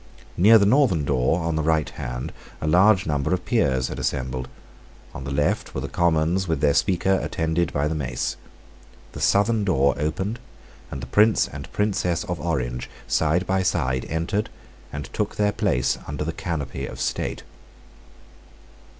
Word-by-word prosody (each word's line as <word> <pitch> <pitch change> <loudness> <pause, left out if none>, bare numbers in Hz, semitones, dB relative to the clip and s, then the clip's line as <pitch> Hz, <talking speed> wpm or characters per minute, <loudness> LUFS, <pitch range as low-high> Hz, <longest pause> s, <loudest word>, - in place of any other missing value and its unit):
Near 110 +6 +7
the 100 - +3
northern 105 - +3
door, 70 +5 +1
on 80 -1 -1
the 80 - 0
right 80 -1 +1
hand, - - -5 0.3
a - - -4
large 95 +4 +5
number 75 +3 0
of 90 - -8
Peers 65 - +1
had - - -5
assembled. 65 -1 -2 0.7
On 65 - -7
the 70 - -4
left 75 +2 0
were - - -2
the - - -3
Commons 85 +2 +1
with 80 -4 0
their 70 -1 +3
Speaker, 95 +2 +2
attended 80 +1 -1
by 70 +1 0
the 80 - -1
mace. 65 -5 -2 0.8
The - - -8
southern 105 +2 +3
door 70 -8 +3
opened: 95 +10 -2 0.5
and 70 - -6
the - - -5
Prince 105 +11 +4
and 70 -1 -9
Princess 95 -5 0
of - - -4
Orange, 60 0 -2 0.2
side 80 +4 +1
by 95 +1 +1
side, 65 -9 0
entered, 85 +6 -1 0.4
and 75 -1 -5
took - - -2
their 105 0 +2
place 65 -9 0
under 75 +1 -3
the 80 +2 -3
canopy 75 -7 -4
of - - -9
state. - - -2
80 Hz, 165 wpm, -24 LUFS, 70-95 Hz, 0.8 s, Near